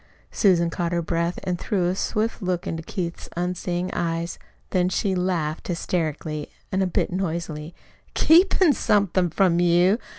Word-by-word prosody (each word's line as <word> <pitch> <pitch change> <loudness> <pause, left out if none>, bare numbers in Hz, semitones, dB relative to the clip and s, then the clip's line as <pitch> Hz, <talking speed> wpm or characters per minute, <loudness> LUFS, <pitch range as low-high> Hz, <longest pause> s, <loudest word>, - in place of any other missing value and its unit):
Susan 170 -5 +3
caught 170 0 -2
her 170 - +1
breath 170 +1 -1
and 180 -1 -2
threw 185 -3 0
a 180 - +1
swift 215 +4 -1
look 180 -2 -1
into 165 - -3
Keith's 170 +1 -5
unseeing 180 0 -2
eyes. 170 0 -2 0.3
Then 180 -1 +2
she 195 +1 0
laughed, 175 -4 -1
hysterically, 155 -3 -2 0.2
a 190 0 +1
bit 180 - 0
noisily. 170 -3 -3 0.4
"Keepin' 350 0 +5
somethin' 195 -6 +2
from 175 0 +2
you? 175 +5 +4
175 Hz, 140 wpm, -24 LUFS, 170-190 Hz, 0.4 s, Keepin